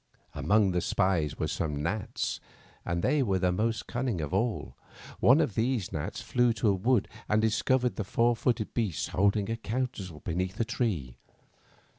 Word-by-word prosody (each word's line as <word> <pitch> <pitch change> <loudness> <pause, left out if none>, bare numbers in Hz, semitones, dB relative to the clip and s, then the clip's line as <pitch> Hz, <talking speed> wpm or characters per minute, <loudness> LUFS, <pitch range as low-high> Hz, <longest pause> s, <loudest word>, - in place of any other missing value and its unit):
Among 95 +8 +3
the 90 -1 0
spies 90 -7 +1
were - - -1
some 75 -1 -2
gnats, 100 +5 -2 0.4
and 85 0 -2
they 145 +2 +3
were 100 -7 +1
the 90 -1 +2
most 110 +4 -1
cunning 120 -6 -2
of 75 +2 -4
all. 115 +3 -1 0.4
One 130 +6 +6
of 150 -10 +1
these 115 -2 0
gnats 75 - -4
flew 120 -1 +2
to 110 -1 +1
a - - +4
wood 110 +4 +2 0.2
and 105 - +3
discovered 120 +3 +1
the 105 - -1
four 115 +4 +2
footed 115 -1 -1
beasts 105 -9 -1
holding 100 +1 +2
a 115 - -2
council 110 -8 -4
be 85 - -4
neath 95 +2 -2
a 115 - 0
great - - -22
tree. 95 - -2
105 Hz, 180 wpm, -29 LUFS, 90-120 Hz, 0.4 s, One